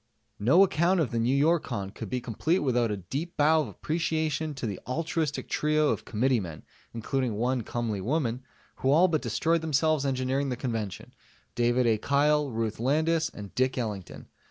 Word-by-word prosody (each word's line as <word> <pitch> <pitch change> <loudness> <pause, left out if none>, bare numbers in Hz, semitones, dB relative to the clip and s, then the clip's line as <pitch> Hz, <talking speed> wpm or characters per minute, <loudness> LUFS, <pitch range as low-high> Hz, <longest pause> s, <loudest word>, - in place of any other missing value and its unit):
No 135 - +6
account 180 0 +2
of 155 - 0
the 115 - -1
Newyorcon 130 - +1
could 110 - -7
be 125 - -1
complete 125 - 0
without 125 -4 +1
a 105 - -2
deep 140 - -5
bow 155 +2 +4
of 145 - -3
appreciation 155 - -2
to 135 - -5
the 100 -4 -4
altruistic 155 +2 -2
trio 150 0 +1
of - - -2
committeemen 110 - -1 0.3
(including 120 0 -2
one 125 +3 0
comely 110 -3 -3
woman) 125 +1 -1 0.4
who 130 - 0
all 165 +6 +6
but 160 -4 0
destroyed 135 +8 0
themselves 155 -1 +1
engineering 135 +1 0
the 125 - -1
Convention: 115 -6 -4 0.4
David 120 +1 +2
A. 110 -2 +2
Kyle, 145 +3 +2
Ruth 110 -2 -3
Landis 160 +6 +1
and 100 -2 -10
Dick 130 +1 0
Ellington. 105 -7 -5
130 Hz, 165 wpm, -28 LUFS, 115-155 Hz, 0.4 s, No